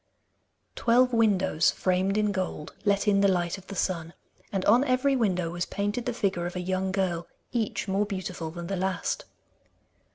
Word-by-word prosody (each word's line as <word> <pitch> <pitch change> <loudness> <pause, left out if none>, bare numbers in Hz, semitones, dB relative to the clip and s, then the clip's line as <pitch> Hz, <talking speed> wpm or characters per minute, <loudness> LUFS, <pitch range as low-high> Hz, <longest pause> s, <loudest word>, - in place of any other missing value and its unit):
Twelve 250 +2 +3
windows 190 -9 +3
framed 185 +2 +1
in 210 -1 +2
gold 185 -6 -3
let 200 0 +2
in 200 -1 +4
the 200 - +5
light 180 -1 0
of 190 - -19
the 200 - -7
sun, 170 -3 -2 0.4
and 195 -2 -1
on 235 +5 +6
every 265 +1 +2
window 180 -8 +1
was 175 0 -3
painted 205 +4 -2
the - - +1
figure 185 -5 -1
of 175 - -7
a - - -2
young 185 +1 -1
girl, 180 -3 -1 0.2
each 225 -4 -1
more 200 +2 +1
beautiful 185 -4 -4
than 170 +1 -7
the 195 - -2
last. 190 0 -1
190 Hz, 175 wpm, -27 LUFS, 180-210 Hz, 0.4 s, on